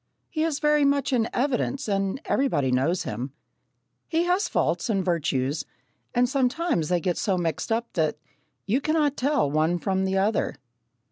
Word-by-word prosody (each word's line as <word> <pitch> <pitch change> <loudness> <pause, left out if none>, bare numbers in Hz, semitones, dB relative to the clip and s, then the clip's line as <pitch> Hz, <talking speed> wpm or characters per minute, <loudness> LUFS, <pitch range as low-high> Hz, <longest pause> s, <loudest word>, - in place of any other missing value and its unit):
He 310 - -2
is 320 -3 +1
very 300 -1 +3
much 280 -2 +2
in 230 -2 +2
evidence 270 0 -1
and 195 +3 0
everybody 145 - +1
knows 140 +8 +1
him. 125 +6 -5 0.7
He 330 0 +1
has 360 +3 +1
faults - - 0
and 195 -4 +1
virtues, 145 -5 0 0.5
and 245 +1 +4
sometimes 265 - 0
they 180 -1 +2
get 175 +1 -1
so 195 -3 +1
mixed 170 +4 -2
up 230 +1 -1
that 155 -3 0 0.5
"you 235 +7 +1
cannot 300 -2 +1
tell 280 - +1
one 155 +3 +2
from 190 +2 0
t'other." 195 +3 +1
215 Hz, 155 wpm, -25 LUFS, 170-280 Hz, 0.7 s, and